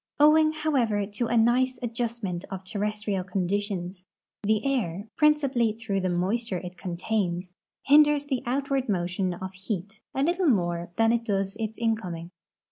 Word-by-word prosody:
Owing, 310 +1 +6
however, 255 -10 +1
to 210 +4 -3
a 235 - +1
nice 250 +3 +3
adjustment 230 -6 -3
of 190 -1 -6
terrestrial 210 0 -2
conditions, 185 0 -2 0.3
the 215 +2 +1
air, 210 -8 -1
])rincipally 270 -7 +3
through 205 -4 -1
the 185 - 0
moisture 190 +4 0
it 180 +1 -7
contains, 180 -1 -2 0.3
hinders 295 0 +5
the 265 -3 -1
outward 270 0 0
motion 180 -1 0
of 190 +1 -6
heat 200 +2 -5
a 270 - +1
little 345 +2 +2
more 175 -5 +1
than 225 0 +4
it 235 0 +1
does 195 -3 -1
its 220 0 -3
incoming. 185 -8 -2
215 Hz, 145 wpm, -27 LUFS, 185-245 Hz, 0.3 s, Owing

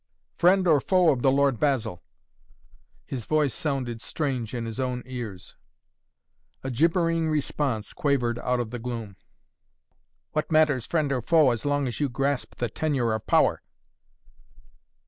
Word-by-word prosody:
Friend 185 +1 +4
or 150 -4 +5
foe 180 -1 +4
of 130 -4 -1
the 135 - +4
Lord 140 -3 +2
Basil?" 115 - 0 1.0
His 125 -5 -5
voice 150 -4 +2
sounded 130 -6 -3
strange 130 -7 -3
in 120 -1 -3
his 115 +2 -6
own 125 -1 -2
ears. 115 -8 -7 1.1
A 135 - -3
gibbering 165 +3 +2
response 140 -6 -1
quavered 120 -5 0
out 125 0 0
of 115 -2 -3
the 120 - -5
gloom. 115 -4 -5 1.2
"What 155 +2 -2
matters 155 -6 +3
friend 155 -4 0
or 130 -2 0
foe 155 0 +4
as 120 +1 -4
long 145 -1 +1
as 120 - -4
you 145 -2 +1
grasp 135 +2 -1
the 120 - -2
tenure 125 -2 -1
of 110 - -4
power?" - - +3
135 Hz, 145 wpm, -26 LUFS, 120-150 Hz, 1.2 s, or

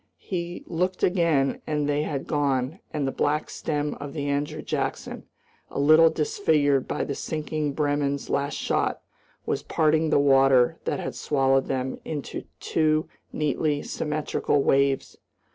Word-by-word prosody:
He 175 -2 -5
looked 180 +2 -2
again 165 -7 +2
and 150 -1 0
they 145 0 +1
had 145 -3 -3
gone, 140 +1 0
and 145 -3 -1
the - - 0
black 150 +3 -1
stem 150 -2 -2
of 145 -1 -7
the 145 -2 -3
Andrew 145 +1 -2
Jackson, - - -3 0.4
a - - -4
little 155 +3 +7
disfigured 150 -4 +1
by - - -1
the 140 - -3
sinking 155 0 -3
Bremen's 145 -1 0
last 140 0 -1
shot, - - -1 0.4
was - - -1
parting 160 0 +2
the - - +3
water 135 -3 +4
that - - -1
had - - -4
swallowed 135 -2 +1
them 130 -1 -2
into 150 -3 -5
two 155 -1 +1 0.2
neatly 150 0 0
symmetrical 150 -2 -1
waves. 135 0 +1
145 Hz, 145 wpm, -25 LUFS, 140-155 Hz, 0.4 s, little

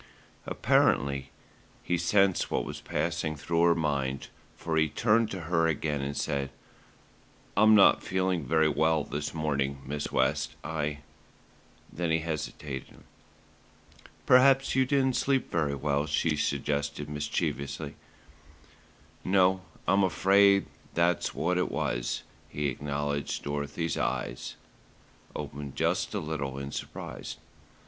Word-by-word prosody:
Apparently 70 0 +2 0.5
he 90 - 0
sensed 95 +2 +2
what - - -1
was - - -7
passing 80 -2 -2
through 85 +3 -1
her 85 0 +5
mind, 70 -4 -1 0.3
for 80 -1 -3
he 80 -1 +3
turned 110 - +2
to 95 - -5
her 80 0 +1
again 75 -2 -1
and 70 +1 -3
said: 70 -1 -1 1.1
"I'm 110 +2 +6
not 100 - +6
feeling 95 -3 0
very 80 +4 +3
well 80 +1 +2
this 75 +1 -4
morning, 70 -3 -1
Miss 75 +2 -4
West, 65 0 +1
I 75 -2 -3 0.5
" - - -28
Then 85 +2 -2
he 80 - +3
hesitated. 75 -4 -5 1.3
"Perhaps 135 +1 +5
you 130 -1 +3
didn't 130 -2 +2
sleep 135 -1 +1
very 75 -4 0
well," 70 +1 0
she 75 +1 +1
suggested 70 0 -1
mischievously. 75 -1 -3 1.3
"No, 95 0 +3 0.3
I'm 95 +2 +4
afraid 100 +2 +4 0.3
that's 85 0 +1
what 90 +1 +1
it - - 0
was," - - -2 0.3
he 75 -1 -1
acknowledged 70 +1 -3
Dorothy's 75 +3 -2
eyes - - -3 0.8
opened 70 -1 -6
just - - 0
a - - 0
little 70 -4 -4
in 70 0 -5
surprise. - - -6
75 Hz, 125 wpm, -29 LUFS, 70-90 Hz, 1.3 s, I'm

